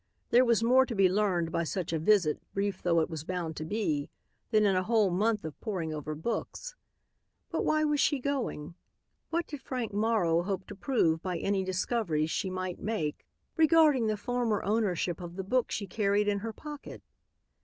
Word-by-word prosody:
There 245 +2 +6
was 235 -2 +3
more 255 +3 +6
to 235 - -4
be 195 -2 +5
learned 185 -4 +1
by 170 - 0
such 165 +2 -3
a 160 - 0
visit, 170 -3 +3
brief 200 -1 -1
though 170 -2 +3
it 160 - -1
was 155 -2 -5
bound 170 -2 -3
to - - -3
be, 160 -6 -1 0.4
than 215 -2 +4
in 195 -2 +3
a 185 - +2
whole 215 -1 +2
month 210 +2 +1
of 155 - -8
poring 180 -8 -3
over 155 0 -4
books. 235 - -4 0.8
But - - -1
why 310 0 +2
was 295 -1 +1
she 290 - +3
going? 245 - -3 0.6
What 335 +1 0
did 290 -4 -8
Frank 250 -6 -4
Morrow 205 -6 +2
hope 190 +1 -3
to 205 - -7
prove 180 - +1
by 180 -1 -2
any 195 +2 0
discoveries 185 -4 -1
she 190 - -1
might 185 -1 -4
make 165 -9 -3 0.3
regarding 310 -6 +5
the 215 -1 0
former 240 -1 -1
ownership 190 -5 0
of 175 0 -7
the 190 - -4
book 245 +6 +1
she 200 - -3
carried 205 +1 +1
in 205 -1 +1
her 225 +2 -4
pocket? 295 +5 -9
200 Hz, 190 wpm, -30 LUFS, 175-230 Hz, 0.8 s, There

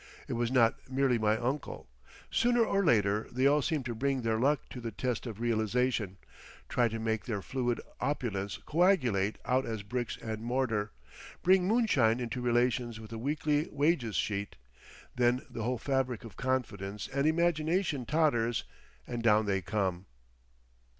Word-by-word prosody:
It - - -3
was 120 +1 0
not 120 -1 +2
merely 130 -2 +2
my 110 0 +2
uncle. 130 +5 -3 0.4
Sooner 240 -1 +3
or 200 -2 +1
later 105 - +2
they 130 +2 +1
all 145 +2 +5
seem 150 -1 -1
to 120 -1 -3
bring 135 +2 -1
their 110 -1 +1
luck 140 +4 +2
to 125 - -7
the 115 - -3
test 125 +2 -3
of 110 -2 -7
realisation, 115 -2 0 0.5
try 120 -1 +2
to 115 0 -4
make 110 -1 -2
their 105 -6 -3
fluid 120 -3 -1 0.2
opulence 100 -9 -2
coagulate 130 - +2
out 130 +1 +2
as 110 -3 -4
bricks 120 +3 -3
and 110 -1 -5
mortar, 115 -4 -1 0.5
bring 185 0 +4
moonshine 145 - +3
into 125 +1 -3
relations 120 -1 +1
with 110 0 -10
a 115 - -5
weekly 150 +3 0
wages 145 - +1
sheet. 100 -1 -2 0.6
Then 125 0 +2
the 115 - -5
whole 125 +3 -1
fabric 130 -2 -1
of 115 -4 -10
confidence 105 -6 -2
and 140 +2 0
imagination 160 - +1
totters—and 120 - -1
down 110 -1 +4
they 95 -1 0
come.... 95 -1 -2
120 Hz, 155 wpm, -31 LUFS, 110-140 Hz, 0.6 s, all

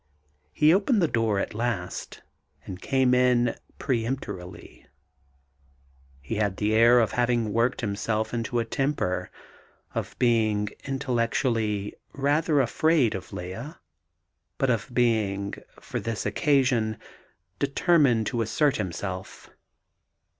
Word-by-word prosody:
He 150 - +4
opened 210 +4 +3
the 170 - +3
door 115 -6 +1
at - - -2
last, 110 -5 -4 0.4
and 90 -1 -8
came 130 -2 +2
in 125 -1 +4
rather 120 - -3 0.2
peremptorily. 115 -7 -4 1.3
He 70 +11 -4
had 100 -3 0
the 105 +1 0
air 120 +2 +6
of 110 -4 +2
having 120 -3 +1
worked 120 +3 +1
himself 110 +1 -2
into 120 +1 -2
a 115 - +1
temper 135 -9 -1 0.6
of - - -4
being 110 -4 +2 0.2
intellectually 115 -5 -1 0.2
rather 145 +2 +2
afraid 140 0 +2
of 95 - -7
Lea, 110 - -6 0.8
but 135 -2 +2
of 115 +2 -1
being, 110 -5 +1 0.3
for - - -5
this 115 -3 -4
occasion, 125 -8 +2 0.6
determined 140 -5 +3
to 115 +2 -1
assert 140 +6 +1
himself. 95 -1 -5
115 Hz, 115 wpm, -26 LUFS, 105-135 Hz, 1.3 s, air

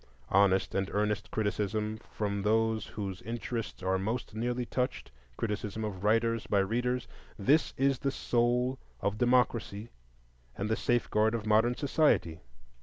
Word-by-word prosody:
Honest 95 -1 +3
and 95 0 0
earnest 105 0 0
criticism 105 0 -1
from 100 -1 -2
those 110 +1 +1
whose 95 -3 -5
interests 115 -2 -4
are 95 0 +1
most 110 +3 -3
nearly 120 +2 -1
touched,—criticism 105 - -4
of 95 -3 -5
writers 115 +1 +2
by 105 - +2
readers,—this 125 +5 0
is 135 -1 +2
the 140 - 0
soul 125 0 +1 0.2
of 100 +1 -1
democracy 120 -3 +1 0.7
and 105 +2 -2
the 110 - +2
safeguard 110 -2 +1
of 110 -2 -4
modern 110 +3 +3
society. 140 - +2
110 Hz, 125 wpm, -30 LUFS, 100-120 Hz, 0.7 s, Honest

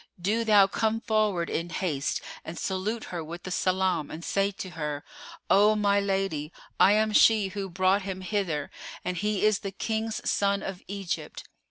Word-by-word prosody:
do 210 +6 +1
thou 210 -3 +6
come 220 +3 0
forward 215 -6 +1
in 170 +1 -2
haste 155 -6 -2 0.2
and 160 +1 -7
salute 205 +4 -2
her 170 -2 -3
with 170 +3 -8
the 185 - -6
salam 185 -4 +1
and 165 +2 -7
say 200 0 +1
to 190 -2 -7
her:—O 165 +7 0
my 200 -1 +3
lady, 195 -6 -1 0.3
I 200 - +7
am 215 0 +2
she 215 -2 +5
who 195 0 -5
brought 185 +3 +2
him 190 -1 -5
hither 185 -7 -2 0.3
and 180 - -1
he 210 +2 0
is 215 -2 +3
the 195 - -4
King's 220 +3 -3
son 200 0 +1
of 190 -1 -5
Egypt." 195 -5 -4
195 Hz, 170 wpm, -27 LUFS, 175-210 Hz, 0.3 s, I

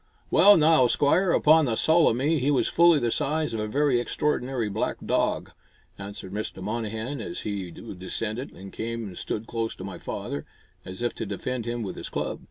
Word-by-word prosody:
"Well, 205 +5 +7
now, 155 -5 +5
Squire, 160 +9 +2
upon 155 0 +5
the 115 -4 0
sowl 160 +7 +4
o' - - +4
me, 145 +5 +1
he 135 +2 +1
was 145 - +2
fully 170 -1 +5
the 120 -4 0
size 155 +3 0
of 110 - -2
a 105 - -2
very 135 +1 +2
extraordinary 125 -1 -1
black 105 +2 -2
dog," - - 0 0.5
answered 100 -2 -7
Mr. 105 -2 -4
Monnehan, 110 +5 -3
as 85 -5 -5
he 100 -4 -4
descended 105 - -5
and 95 +1 -11
came 115 +1 -4
and 95 -4 -7
stood 110 +4 -4
close 115 -1 -3
to - - -9
my 95 -1 -7
father, 70 0 -5 0.4
as 95 +5 -6
if 120 - 0
to 110 - -5
defend 120 +4 -4
him 120 0 -2
with 95 - -6
his - - -6
club. - - -3
115 Hz, 195 wpm, -26 LUFS, 105-145 Hz, 0.5 s, Well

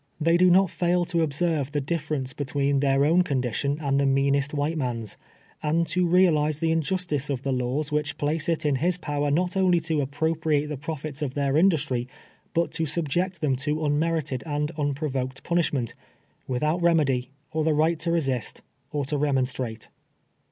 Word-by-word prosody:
They 165 +2 +3
do 180 +1 +5
not 185 0 +4
fail 175 0 +1
to 170 0 0
observe 150 -2 0
the 145 - +1
difference 145 -3 -2
between 140 0 0
their 135 0 +3
own 170 +4 +4
condition 140 -2 -1
and 140 -2 +1
the 140 - +2
meanest 140 +1 +2
white 150 +2 -1
man's, 120 -7 -3 0.5
and 160 +2 +1
to 180 0 +1
realize 160 -4 +3
the 160 +1 0
injustice 160 -3 -1
of 135 -2 -2
the 135 - -1
laws 130 +4 -1
which 150 0 -1
place 150 +3 -1
it 165 -1 0
in 145 -2 +2
his 175 +5 +1
power 145 -3 -2
not 180 +6 0
only 185 -2 +3
to 160 -2 0
appropriate 150 +1 0
the 150 - -3
profits 155 0 -6
of 135 -3 -3
their 140 -1 0
industry, 150 -8 +2 0.5
but 170 0 +1
to 160 - -1
subject 170 +4 -1
them 140 -4 +2
to 150 +3 -2
un 145 0 +2
merited 160 -5 -1
and 150 0 -1
unprovoked 135 -3 -2
punishment, 150 -9 0 0.5
without 150 +7 0
reme 165 -3 +4
dy, 130 -2 -1 0.2
or 155 0 0
the 155 -1 +2
right 160 +2 +2
to 170 - 0
resist, 135 - -1 0.3
or 145 -2 -1
to 145 +1 -2
remonstrate. 130 -5 -1
150 Hz, 180 wpm, -25 LUFS, 140-165 Hz, 0.5 s, do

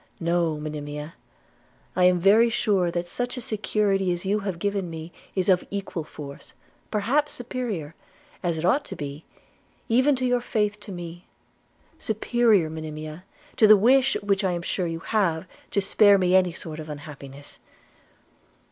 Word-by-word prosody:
No, 170 -2 +1
Monimia, 150 +1 -6 0.8
I 180 - +4
am 180 0 +5
very 210 +6 +5
sure 200 -6 +1
that 175 0 -3
such 245 +7 -2
a - - -2
security 205 -4 0
as 175 +1 -2
you 205 +2 +1
have 195 -4 -4
given 200 0 -2
me 160 +1 -7 0.2
is 185 -2 0
of 185 -2 +4
equal 195 -4 -4
force, 140 -2 -10 0.3
perhaps 255 +8 +1
superior, 230 - -4 0.5
as 170 -2 -1
it 160 - -2
ought 265 +11 +3
to - - -7
be, 145 +2 -7 0.6
even 260 +5 +4
to 255 0 -2
your 245 -1 +2
faith 210 -3 -1
to 205 - -9
me 175 -1 -8 0.3
– - - -36
superior, 220 -4 +3
Monimia, 155 +1 -7 0.3
to 215 - +6
the 215 0 +9
wish 260 +5 +4
which 200 0 +1
I 185 -2 +1
am 170 -1 -3
sure 180 0 -1
you 165 0 -4
have, 190 -6 0 0.2
to 200 - +1
spare 200 +1 +5
me 185 -1 +3
any 185 -1 +4
sort 160 -1 -7
of 155 0 -8
unhappiness.' 145 -1 -9
185 Hz, 165 wpm, -25 LUFS, 160-215 Hz, 0.8 s, the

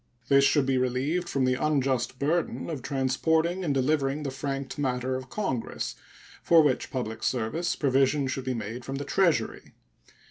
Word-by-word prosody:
This 140 0 +6
should 140 0 +4
be 130 -1 +1
relieved 135 +8 -1
from 135 -4 +1
the 130 - +2
unjust 135 -5 0
burden 165 +4 -1
of 145 -5 -4
transporting 160 +8 0
and 160 - 0
delivering 140 +1 +1
the 140 - -3
franked 135 +1 -4
matter 130 -1 -1
of 130 0 -6
Congress, 135 - -3 0.5
for 165 -2 +6
which 135 -4 +1
public 115 -4 -4
service 130 +9 -1
provision 135 0 +2
should 130 0 -3
be 130 -1 -1
made 115 +2 -5
from 135 - -5
the 140 +1 -4
Treasury. 160 -8 0
135 Hz, 165 wpm, -27 LUFS, 130-150 Hz, 0.5 s, This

